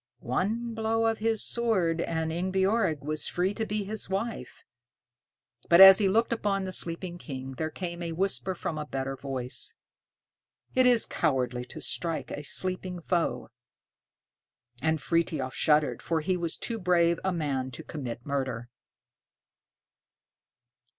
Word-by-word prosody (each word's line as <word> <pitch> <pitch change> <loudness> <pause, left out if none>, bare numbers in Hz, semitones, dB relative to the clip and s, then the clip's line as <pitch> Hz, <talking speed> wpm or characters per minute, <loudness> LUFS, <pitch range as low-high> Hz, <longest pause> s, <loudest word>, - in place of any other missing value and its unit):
One 225 - -1
blow 225 0 0
of 225 0 +1
his 225 0 +2
sword, 190 -9 +1
and 160 -1 -2
Ingebjorg 190 -1 +1
was 155 +1 -2
free 185 +3 0
to 220 +1 -3
be 210 0 -2
his 210 0 -5
wife. 200 +5 -4 1.1
But 170 - +7
as 190 0 +11
he 200 -2 +3
looked 225 +4 +2
upon 200 -3 -1
the 185 0 -5
sleeping 175 +1 -4
King, 135 -5 -7
there 155 +4 -3
came 170 +1 -6
a 170 -1 -3
whisper 190 +1 0
from 160 -2 -4
a 150 - -4
better 135 -1 -3
voice, 135 - -2 1.0
"It 255 -1 +4
is 240 -3 +5
cowardly 125 -5 -1
to - - -10
strike 165 -2 -1
a - - -4
sleeping 185 +3 -1
foe." 170 0 -1 1.3
And 160 0 +1
Frithiof 150 -3 -1
shuddered, 150 -5 +2
for 165 -1 -1
he 185 +4 0
was 170 -2 -2
too 230 -2 -3
brave 170 -2 +2
a 190 - +1
man 140 -6 -2
to 125 - -9
commit 125 -6 -6
murder. 130 -4 -3
170 Hz, 145 wpm, -28 LUFS, 150-195 Hz, 1.3 s, as